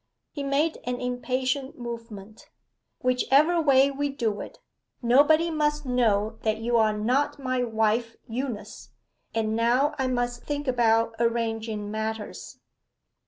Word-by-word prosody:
He 290 - -6
made 280 +3 0
an 250 0 -2
impatient 255 +2 -2
movement. 230 -4 -8 0.5
'Whichever 275 +7 +3
way 275 -2 +5
we 285 +1 -2
do 225 -6 -2
it, - - -9 0.4
nobody 295 +7 +4
must 300 -1 0
know 225 -4 +1
that 220 0 0
you 235 +2 -1
are 220 -1 +4
not 250 +9 +1
my 255 -2 -1
wife 225 0 0
Eunice. 240 -2 -5 0.5
And 220 -1 0
now 245 +6 +2
I 265 - +1
must 245 -1 -1
think 290 -1 -4
about 230 -2 +2
arranging 225 -3 -1
matters. 220 0 -5
245 Hz, 125 wpm, -26 LUFS, 225-275 Hz, 0.5 s, way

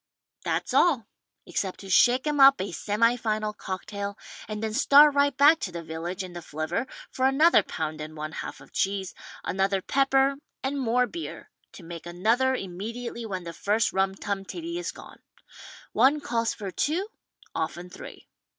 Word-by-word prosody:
That's - - -2
all 285 -10 +4 0.2
— - - -55
except 190 -2 -3
to 195 - -10
shake 245 +8 +5
'em 295 -1 0
up 275 0 +8
a 190 0 -3
semi 215 +7 +2
final 215 -2 -1
cocktai^ 200 +1 -5 0.3
and 215 0 -5
then 220 -1 -2
start 285 +4 +7
right 285 -1 +2
back 300 +3 +7
to 180 - -4
the 170 -1 -6
village 170 +4 -5
in 180 -1 -9
the 175 - -6
flivver 160 - -3 0.2
for 260 0 +2
another 305 +6 +5
p«und 155 -1 -4
and 155 +1 -8
one 155 +1 -4
half - - -6
of - - -16
cheese, 195 -1 -1 0.3
another 195 +1 0
pepper 270 +5 +2 0.3
and 275 +1 -1
more 250 0 +2
beer 335 +6 -8 0.2
to 185 - -12
make 170 0 -8
another 230 +9 +2
immediately 230 +4 -5
when 185 -3 -4
the 170 -1 -7
first 210 +7 +1
rum 190 0 +1
tum 195 0 -3
tiddy 340 - -5
is 355 - -3
gone. - - -14 0.7
One 285 +3 +4
calls 230 -5 -1
for 200 -3 -6
two, 335 - -1 0.5
often 170 +2 -3
three. 180 - -11
215 Hz, 175 wpm, -26 LUFS, 185-270 Hz, 0.7 s, up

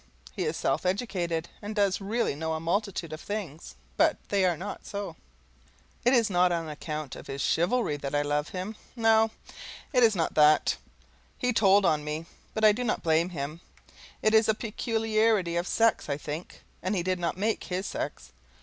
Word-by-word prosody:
He 185 - -1
is 155 +1 -1
self 135 +4 0
educated, 180 -4 -1
and 210 +1 -5
does 200 -2 +2
really 220 +1 0
know 160 +3 -3
a - - -3
multitude 175 -1 -2
of 155 - -7
things, 165 - -6 0.2
but - - +4
they 200 -2 +3
are 175 -3 +2
not 200 +5 -6
so. 200 0 -5 0.9
It 250 +2 +5
is 230 -3 +4
not 180 -2 +3
on 165 -2 -1
account 150 -1 -5
of - - -10
his 135 0 -5
chivalry 175 - +1
that 140 0 -4
I 145 - +2
love 145 +1 -1
him 190 +4 -5 0.2
no, 225 -1 +4 0.6
it 250 - +4
is 225 -3 +5
not 165 -3 0
that. 150 0 +5 0.6
He 250 0 0
told 200 -2 +5
on 150 -3 +2
me, 150 +2 -4 0.3
but 220 0 +3
I 215 - +9
do 235 +4 -2
not 230 - -1
blame 165 +2 +2
him; 155 0 -5 0.6
it 215 - +3
is 220 0 +5
a 220 - +4
peculiarity 220 -4 +1
of 175 +1 -1
sex, 225 -8 +2
I 140 - 0
think, 150 +3 -7 0.2
and 185 +3 -1
he 175 - 0
did 185 0 0
not 170 0 -1
make 215 +3 -1
his 185 +2 -3
sex. - - -5
185 Hz, 190 wpm, -28 LUFS, 160-215 Hz, 0.9 s, I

